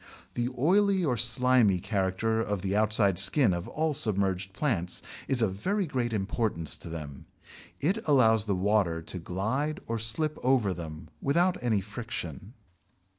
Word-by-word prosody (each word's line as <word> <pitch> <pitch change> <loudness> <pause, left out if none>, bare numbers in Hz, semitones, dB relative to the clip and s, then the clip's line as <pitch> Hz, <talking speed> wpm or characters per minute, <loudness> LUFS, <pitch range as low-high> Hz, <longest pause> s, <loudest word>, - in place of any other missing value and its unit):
The 120 0 -1
oily 190 +6 +3
or 130 -5 +1
slimy 115 -3 +3
character 100 +3 -1
of 105 -4 -3
the 95 0 -1
outside 105 -3 +2
skin 100 +2 +4
of 85 0 -4
all 155 0 -1
submerged 95 -5 0
plants 95 - -2 0.2
is 130 -4 +2
of 100 -4 +1
very 195 - -1
great 125 -6 -2
importance 100 -5 -1
to - - -8
them. 75 -5 -8 0.5
It 185 +10 0
allows 110 -7 +4
the 100 -2 0
water 90 -4 +1
to 90 - -5
glide 110 - -2
or 115 0 -3
slip 130 +8 0
over 125 -7 +2
them 80 -2 -8
without 175 +6 +2
any 110 -5 +1
friction. 105 - -7
110 Hz, 150 wpm, -28 LUFS, 95-130 Hz, 0.5 s, skin